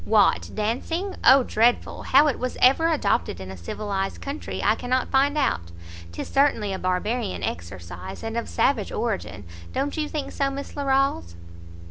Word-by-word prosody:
"What 215 Hz, -1 st, +3 dB
dancing? 295 Hz, -, -2 dB
Oh 265 Hz, 0 st, +7 dB
dreadful! 235 Hz, +1 st, +1 dB
how 280 Hz, +3 st, +5 dB
it 290 Hz, -, 0 dB
was 255 Hz, 0 st, -3 dB
ever 275 Hz, +6 st, +5 dB
adopted 290 Hz, -, 0 dB
in 95 Hz, 0 st, -7 dB
a -, -, -7 dB
civilized 195 Hz, -, -4 dB
country 280 Hz, +2 st, -5 dB
I 210 Hz, -, +4 dB
cannot 250 Hz, +3 st, -1 dB
find 280 Hz, +2 st, +3 dB
out; 85 Hz, -, 0 dB, 0.4 s
'tis 85 Hz, -, -6 dB
certainly 270 Hz, -8 st, +2 dB
a 190 Hz, -, -4 dB
Barbarian 185 Hz, -, -1 dB
exercise, 85 Hz, +1 st, -6 dB
and 225 Hz, 0 st, -4 dB
of 235 Hz, -, -3 dB
savage 240 Hz, -7 st, +1 dB
origin. 205 Hz, -, -3 dB, 0.3 s
Don't 280 Hz, +2 st, -1 dB
you 305 Hz, -1 st, -1 dB
think 300 Hz, -3 st, -4 dB
so, 275 Hz, -1 st, 0 dB
Miss 275 Hz, +1 st, -7 dB
Larolles?" 275 Hz, -, 0 dB
235 Hz, 160 wpm, -24 LUFS, 190-275 Hz, 0.4 s, Oh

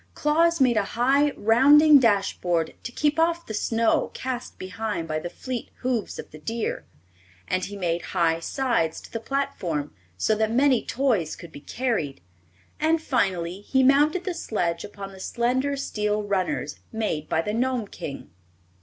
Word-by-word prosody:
Claus 335 Hz, +3 st, +2 dB
made 250 Hz, -4 st, +4 dB
a 210 Hz, -, +3 dB
high, 275 Hz, +4 st, +4 dB
rounding 285 Hz, +7 st, +7 dB
dash 205 Hz, -6 st, +2 dB
board 170 Hz, -2 st, 0 dB
to 245 Hz, -, -6 dB
keep 295 Hz, +4 st, 0 dB
off 335 Hz, +1 st, +1 dB
the 220 Hz, -, -6 dB
snow 225 Hz, +2 st, +1 dB
cast 255 Hz, -1 st, -5 dB
behind 185 Hz, -2 st, -4 dB
by 155 Hz, -1 st, -1 dB
the 175 Hz, -, -5 dB
fleet 250 Hz, +5 st, -6 dB
hoofs 250 Hz, -5 st, -1 dB
of -, -, -8 dB
the 155 Hz, -, -11 dB
deer; 225 Hz, +8 st, -3 dB, 0.6 s
and 185 Hz, 0 st, 0 dB
he 205 Hz, 0 st, -7 dB
made 175 Hz, -2 st, -1 dB, 0.2 s
high 165 Hz, -1 st, +3 dB
sides 225 Hz, -, 0 dB
to -, -, -14 dB
the 230 Hz, -, -3 dB
platform 180 Hz, -, -2 dB, 0.2 s
so 215 Hz, -, +2 dB
that 220 Hz, 0 st, +1 dB
many 260 Hz, +1 st, +3 dB
toys 230 Hz, -, 0 dB
could 170 Hz, -, -11 dB
be 145 Hz, -, -11 dB
carried, 225 Hz, -, -2 dB, 0.6 s
and 320 Hz, +1 st, +2 dB
finally 190 Hz, -, -1 dB
he 265 Hz, +5 st, +2 dB
mounted 295 Hz, +6 st, +4 dB
the 370 Hz, -, -2 dB
sledge 175 Hz, -, -2 dB
upon 200 Hz, -1 st, -8 dB
the 190 Hz, -, -13 dB
slender 255 Hz, +7 st, 0 dB
steel 210 Hz, -5 st, -1 dB
runners 195 Hz, -3 st, -2 dB
made 210 Hz, -9 st, -2 dB
by 160 Hz, -, +1 dB
the 210 Hz, -, -2 dB
Gnome 245 Hz, -1 st, 0 dB
King. 140 Hz, -7 st, -8 dB
225 Hz, 165 wpm, -25 LUFS, 185-270 Hz, 0.6 s, rounding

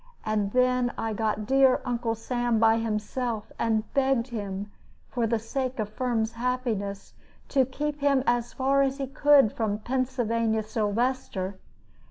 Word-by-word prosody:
And 210 Hz, -2 st, 0 dB
then 250 Hz, 0 st, +2 dB
I 225 Hz, -1 st, -2 dB
got 215 Hz, 0 st, -1 dB
dear 265 Hz, +1 st, +4 dB
Uncle 235 Hz, -2 st, -1 dB
Sam 240 Hz, +1 st, -1 dB
by 225 Hz, 0 st, +4 dB
himself, 225 Hz, +1 st, -3 dB
and 220 Hz, -2 st, +1 dB
begged 265 Hz, -2 st, +2 dB
him, 205 Hz, -3 st, -5 dB, 0.4 s
for 235 Hz, -3 st, -1 dB
the 230 Hz, +1 st, +1 dB
sake 255 Hz, +3 st, -3 dB
of 215 Hz, -2 st, -2 dB
Firm's 225 Hz, -1 st, -1 dB
happiness, 230 Hz, -5 st, -3 dB, 0.4 s
to 265 Hz, -3 st, +3 dB
keep 290 Hz, +3 st, -3 dB
him 280 Hz, -2 st, +3 dB
as 240 Hz, 0 st, +1 dB
far 275 Hz, +1 st, +2 dB
as 270 Hz, 0 st, +1 dB
he 275 Hz, -, -2 dB
could 275 Hz, -3 st, +4 dB
from 215 Hz, -3 st, -1 dB
Pennsylvania 230 Hz, -2 st, 0 dB
Sylvester. 215 Hz, -3 st, -1 dB
235 Hz, 145 wpm, -27 LUFS, 220-260 Hz, 0.4 s, dear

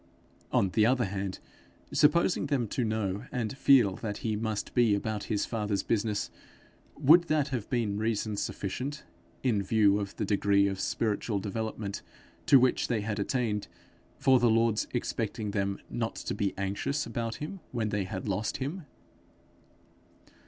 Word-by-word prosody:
On 95 Hz, -, +3 dB
the 105 Hz, +4 st, +2 dB
other 125 Hz, +1 st, +3 dB
hand, 95 Hz, -1 st, -3 dB, 0.5 s
supposing 170 Hz, +1 st, +3 dB
them 135 Hz, -5 st, 0 dB
to 125 Hz, -, -1 dB
know 110 Hz, -1 st, -2 dB
and 120 Hz, 0 st, -2 dB
feel 125 Hz, -9 st, +5 dB
that 105 Hz, -3 st, -4 dB
he 110 Hz, -1 st, +1 dB
must 110 Hz, -1 st, -3 dB
be 120 Hz, -4 st, +4 dB
about 105 Hz, +1 st, -3 dB
his 105 Hz, -2 st, 0 dB
father's 105 Hz, -4 st, -1 dB
business, 105 Hz, -1 st, -1 dB, 0.7 s
would 155 Hz, +5 st, +6 dB
that 150 Hz, -2 st, +1 dB
have 125 Hz, -6 st, -4 dB
been 110 Hz, -5 st, 0 dB
reason 110 Hz, -1 st, -1 dB
sufficient, 130 Hz, +9 st, -4 dB, 0.4 s
in 115 Hz, -6 st, +2 dB
view 100 Hz, 0 st, +3 dB
of 100 Hz, -1 st, -5 dB
the -, -, -2 dB
degree 100 Hz, 0 st, +3 dB
of 95 Hz, -1 st, -1 dB
spiritual 110 Hz, 0 st, -1 dB
development 105 Hz, 0 st, -4 dB, 0.5 s
to 135 Hz, -, +8 dB
which 125 Hz, 0 st, +2 dB
they 115 Hz, -4 st, 0 dB
had 105 Hz, 0 st, -3 dB
attained, 105 Hz, -1 st, -1 dB, 0.5 s
for 130 Hz, -1 st, +4 dB
the 120 Hz, -1 st, +4 dB
Lord's 115 Hz, -1 st, +2 dB
expecting 110 Hz, -3 st, -2 dB
them 100 Hz, -1 st, -1 dB
not -, -, -3 dB
to -, -, -4 dB
be 100 Hz, -1 st, -1 dB
anxious 100 Hz, +9 st, -1 dB
about 115 Hz, 0 st, -3 dB
him 165 Hz, +6 st, -6 dB
when 115 Hz, -3 st, -1 dB
they 105 Hz, -2 st, -1 dB
had 95 Hz, +1 st, -5 dB
lost 100 Hz, +2 st, -1 dB
him? 145 Hz, +5 st, -5 dB
110 Hz, 155 wpm, -29 LUFS, 100-125 Hz, 0.7 s, to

